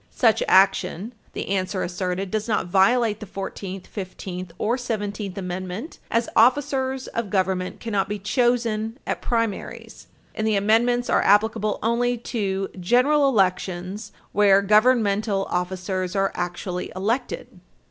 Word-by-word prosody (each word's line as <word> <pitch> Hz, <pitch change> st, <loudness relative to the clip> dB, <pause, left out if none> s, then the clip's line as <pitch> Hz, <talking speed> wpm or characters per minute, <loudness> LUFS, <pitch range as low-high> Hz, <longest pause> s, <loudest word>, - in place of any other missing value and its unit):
Such 225 Hz, -4 st, +2 dB
action, 190 Hz, +2 st, +3 dB, 0.2 s
the -, -, -5 dB
answer 190 Hz, -1 st, -1 dB
asserted, 180 Hz, +1 st, -3 dB
does 215 Hz, +1 st, -2 dB
not 210 Hz, -4 st, 0 dB
violate 210 Hz, +4 st, +3 dB
the 215 Hz, -, -8 dB
Fourteenth, 195 Hz, 0 st, -6 dB
Fifteenth 185 Hz, -2 st, -7 dB
or 230 Hz, +3 st, +1 dB
Seventeenth 205 Hz, -5 st, -4 dB
Amendment, 185 Hz, -, -5 dB
as 230 Hz, +1 st, +1 dB
officers 265 Hz, +1 st, +2 dB
of 230 Hz, -3 st, -3 dB
government 185 Hz, -1 st, -1 dB
cannot 205 Hz, -4 st, -1 dB
be 210 Hz, -, -2 dB
chosen 230 Hz, +1 st, 0 dB
at -, -, -3 dB
primaries, 230 Hz, -4 st, -3 dB, 0.3 s
and 215 Hz, -, -2 dB
the 215 Hz, -, +2 dB
Amendments 235 Hz, +4 st, +2 dB
are -, -, +3 dB
applicable 210 Hz, 0 st, +2 dB
only 240 Hz, +2 st, +1 dB
to 195 Hz, -5 st, -2 dB
general 270 Hz, +9 st, +3 dB
elections, 190 Hz, -2 st, -1 dB, 0.2 s
where 200 Hz, -1 st, +5 dB
governmental 210 Hz, -2 st, +3 dB
officers 185 Hz, +1 st, -2 dB
are 195 Hz, 0 st, +1 dB
actually 175 Hz, +1 st, -4 dB
elected. 220 Hz, -1 st, -3 dB
205 Hz, 125 wpm, -23 LUFS, 190-230 Hz, 0.3 s, where